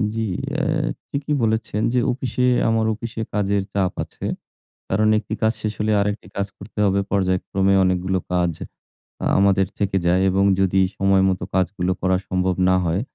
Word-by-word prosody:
জি, 115 Hz, -, -1 dB, 0.4 s
এহ 155 Hz, 0 st, 0 dB, 0.2 s
ঠিকই 145 Hz, +1 st, -2 dB
বলেছেন 110 Hz, -1 st, 0 dB
যে 125 Hz, -, +3 dB
অফিসে, 125 Hz, 0 st, -1 dB, 0.2 s
আমার 115 Hz, -1 st, +2 dB
অফিসে 115 Hz, 0 st, -6 dB
কাজের 100 Hz, -1 st, +1 dB
চাপ 95 Hz, -2 st, 0 dB
আছে। -, -, -9 dB, 0.6 s
কারণ 110 Hz, +3 st, +2 dB
একটি 110 Hz, 0 st, -5 dB
কাজ 110 Hz, +1 st, +3 dB
শেষ 105 Hz, -1 st, -2 dB
হলে 110 Hz, 0 st, +1 dB
আরেকটি 105 Hz, -2 st, -2 dB
কাজ 100 Hz, 0 st, 0 dB
করতে 100 Hz, +2 st, -12 dB
হবে। 100 Hz, 0 st, +2 dB
পর্যায়ক্রমে 95 Hz, 0 st, +1 dB
অনেকগুলো 95 Hz, +1 st, +1 dB
কাজ 90 Hz, -1 st, +1 dB, 0.7 s
আ -, -, 0 dB
আমাদের 95 Hz, -1 st, +3 dB
থেকে 100 Hz, -1 st, +1 dB
যায় 90 Hz, +2 st, +3 dB
এবং 95 Hz, +1 st, +2 dB, 0.2 s
যদি 95 Hz, 0 st, +3 dB, 0.2 s
সময়মতো 95 Hz, -2 st, +2 dB
কাজগুলো 95 Hz, 0 st, 0 dB
করা 95 Hz, 0 st, +2 dB
সম্ভব 90 Hz, -1 st, 0 dB
না 95 Hz, -, +4 dB
হয় 85 Hz, +5 st, 0 dB
100 Hz, 160 wpm, -22 LUFS, 95-110 Hz, 0.7 s, না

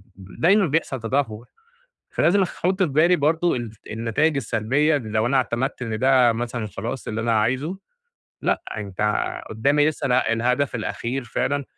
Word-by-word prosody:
دايمًا 175 Hz, -, +2 dB
بيحصل 150 Hz, -3 st, -1 dB
تدهور، 115 Hz, -1 st, -2 dB, 0.6 s
فلازم 195 Hz, +4 st, +2 dB
أخ 185 Hz, -, -2 dB
أحط 190 Hz, +1 st, +2 dB
في 175 Hz, -, +1 dB
بالي 160 Hz, +6 st, +4 dB
برضه 165 Hz, +3 st, +1 dB
الف 115 Hz, -3 st, -6 dB
النتايج 115 Hz, +8 st, 0 dB
السلبية 135 Hz, +5 st, +1 dB
اللي 120 Hz, -7 st, -4 dB
لو 110 Hz, +1 st, +1 dB
أنا 135 Hz, +2 st, +2 dB
اعتمدت 130 Hz, +1 st, -1 dB
إن 110 Hz, -3 st, -3 dB
ده 130 Hz, -3 st, +4 dB
مثلًا 120 Hz, -1 st, -3 dB
خلاص 115 Hz, +5 st, -6 dB
اللي 110 Hz, 0 st, -2 dB
أنا 115 Hz, -1 st, +2 dB
عايزه، 130 Hz, -, -1 dB, 0.7 s
لأ -, -, 0 dB
أنت 100 Hz, -1 st, -5 dB, 0.5 s
قدامي 140 Hz, +7 st, +2 dB
لسه 145 Hz, -2 st, -3 dB
اله 125 Hz, -, +2 dB
الهدف 125 Hz, +4 st, 0 dB
الأخير 125 Hz, +3 st, -3 dB
فعلًا 140 Hz, +4 st, -1 dB
125 Hz, 160 wpm, -23 LUFS, 115-145 Hz, 0.7 s, بالي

